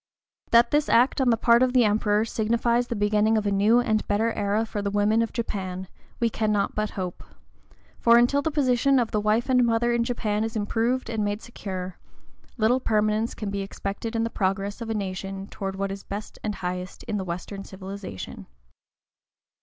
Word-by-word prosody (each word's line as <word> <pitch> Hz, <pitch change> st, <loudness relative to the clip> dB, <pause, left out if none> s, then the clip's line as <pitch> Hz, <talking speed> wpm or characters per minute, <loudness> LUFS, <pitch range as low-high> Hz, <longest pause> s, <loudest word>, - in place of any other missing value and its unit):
That 235 Hz, 0 st, +5 dB
this 295 Hz, 0 st, +2 dB
act 250 Hz, +4 st, +4 dB
on 260 Hz, -, +3 dB
the 230 Hz, -, +3 dB
part 235 Hz, +1 st, +4 dB
of 255 Hz, -1 st, +3 dB
the 250 Hz, -2 st, +5 dB
Emperor 210 Hz, 0 st, +2 dB
signifies 235 Hz, +2 st, +1 dB
the 235 Hz, -, -3 dB
beginning 210 Hz, +1 st, +2 dB
of 215 Hz, -, -1 dB
a 205 Hz, -, +1 dB
new 210 Hz, +4 st, +4 dB
and 220 Hz, -3 st, 0 dB
better 220 Hz, +3 st, +1 dB
era 205 Hz, +2 st, 0 dB
for 210 Hz, -2 st, -4 dB
the 200 Hz, -, -1 dB
women 205 Hz, +2 st, +2 dB
of 230 Hz, -, -1 dB
Japan, 190 Hz, -5 st, -4 dB, 0.3 s
we 235 Hz, -, +2 dB
cannot 215 Hz, -2 st, 0 dB
but 215 Hz, 0 st, -1 dB
hope; 180 Hz, -2 st, -4 dB, 0.8 s
for 235 Hz, 0 st, +6 dB
until 245 Hz, +4 st, +4 dB
the 320 Hz, -, 0 dB
position 275 Hz, -2 st, +2 dB
of 240 Hz, -3 st, +1 dB
the 210 Hz, -, 0 dB
wife 215 Hz, +3 st, +1 dB
and 250 Hz, -2 st, +4 dB
mother 235 Hz, 0 st, +2 dB
in 235 Hz, 0 st, +2 dB
Japan 220 Hz, -3 st, -1 dB
is 225 Hz, +1 st, -4 dB
improved 230 Hz, +4 st, 0 dB
and 225 Hz, -2 st, -2 dB
made 205 Hz, +1 st, -2 dB
secure, 185 Hz, -5 st, -6 dB, 0.6 s
little 230 Hz, +3 st, +3 dB
permanence 215 Hz, -1 st, 0 dB
can 210 Hz, -2 st, -4 dB
be 200 Hz, 0 st, -2 dB
expected 200 Hz, +3 st, -5 dB
in 225 Hz, -, +1 dB
the 230 Hz, -, -2 dB
progress 195 Hz, +2 st, -1 dB
of 230 Hz, -, -4 dB
the 225 Hz, -, -2 dB
nation 195 Hz, -1 st, -4 dB
toward 195 Hz, -1 st, -5 dB
what 195 Hz, 0 st, -2 dB
is 195 Hz, 0 st, -6 dB
best 205 Hz, +2 st, -7 dB
and 210 Hz, -1 st, -2 dB
highest 180 Hz, 0 st, -5 dB
in 210 Hz, -, -3 dB
the 195 Hz, -, -2 dB
Western 185 Hz, +3 st, -6 dB
civilization. 190 Hz, -, -8 dB
215 Hz, 195 wpm, -25 LUFS, 200-235 Hz, 0.8 s, for